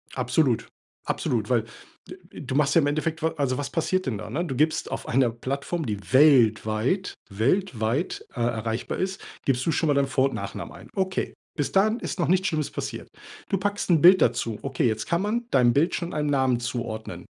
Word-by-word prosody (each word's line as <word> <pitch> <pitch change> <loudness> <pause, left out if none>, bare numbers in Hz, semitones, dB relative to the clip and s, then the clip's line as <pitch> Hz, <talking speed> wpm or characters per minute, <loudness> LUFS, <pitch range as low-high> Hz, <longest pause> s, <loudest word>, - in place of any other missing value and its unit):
Absolut. 125 0 +1 0.4
Absolut, - - -1
weil - - +2 0.4
d - - -9 0.3
du 135 -2 -4
machst 150 0 +2
ja 165 - +6
im - - +1
Endeffekt 155 +2 -2
wa 160 - +3
also, 135 -3 0
was 145 - -4
passiert 185 +3 0
denn 115 -5 -2
da, - - -7
ne? 170 +4 -2
Du 135 -6 -4
gibst 155 +4 +1
auf - - -5
einer 125 -1 +2
Plattform, 140 +7 -3
die 105 -4 -2 0.2
weltweit, 130 - +3
weltweit, 120 - 0
äh, - - -8
erreichbar 115 -1 -2
ist 190 0 -2 0.3
gibst 130 -1 +1
du 165 - +2
schon 160 - 0
mal 145 - +3
deinen 140 -1 +2
Vor 130 0 +2
und - - -6
Nachnamen - - -6
ein, - - -13
okay. 190 -1 -1 0.2
Bis 145 - -1
dahin 215 +4 +3
ist - - -5
noch 170 - +1
nichts 185 +1 +3
Schlimmes 155 -5 -1
passiert. - - -6 0.4
Du 195 - +1
packst 205 +1 -2
'n 170 -3 +5
Bild 185 +2 +8
dazu. 115 -2 +1
Okay, 135 -2 0
jetzt 110 -1 -1
kann 170 +1 +1
man 230 +4 -1
deinem 120 -2 +4
Bild 155 +7 +2
schon 170 0 -4
einen 150 -1 -1
Namen 130 -3 +2
zuordnen. 120 -2 -5
140 Hz, 205 wpm, -25 LUFS, 120-170 Hz, 0.4 s, Bild